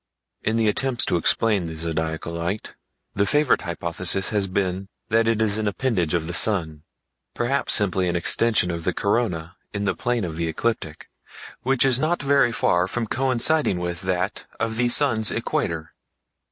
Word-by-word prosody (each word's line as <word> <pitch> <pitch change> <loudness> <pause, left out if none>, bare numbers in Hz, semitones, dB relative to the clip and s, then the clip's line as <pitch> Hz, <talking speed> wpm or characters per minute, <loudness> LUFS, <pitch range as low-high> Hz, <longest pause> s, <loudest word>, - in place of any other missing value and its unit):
In 110 +1 0
the 115 -1 +2
attempts 125 +3 0
to - - 0
explain 100 +3 +2
the 80 - -6
Zodiacal 80 0 -3
Light, 85 +5 -4 0.4
the 100 +1 +1
favorite 145 +3 +3
hypothesis 85 +2 -1
has 100 -2 0
been 95 0 -2 0.2
that 115 0 +3
it 115 -1 +2
is 105 0 0
an 110 - -1
appendage 100 - 0
of 80 -2 -1
the 85 - -5
sun—perhaps 100 - -2
simply 95 -3 +2
an 85 - -1
extension 90 +2 +2
of 85 -1 -4
the 90 +1 -1
corona 95 -6 -1 0.2
in 100 - -1
the 100 - +1
plane 120 -3 -1
of 80 -3 -4
the 85 0 -1
ecliptic, 80 -3 -3 0.5
which 135 0 +2
is 130 -2 +4
not 160 +4 +1
very 140 -3 +3
far 90 -5 +2
from 115 +4 -2
coinciding 130 - +2
with 90 0 -3
that 95 +1 -2
of 115 -1 -2
the 120 0 +2
sun's 120 -5 +3
equator. 80 -2 -2
100 Hz, 165 wpm, -23 LUFS, 85-115 Hz, 0.5 s, is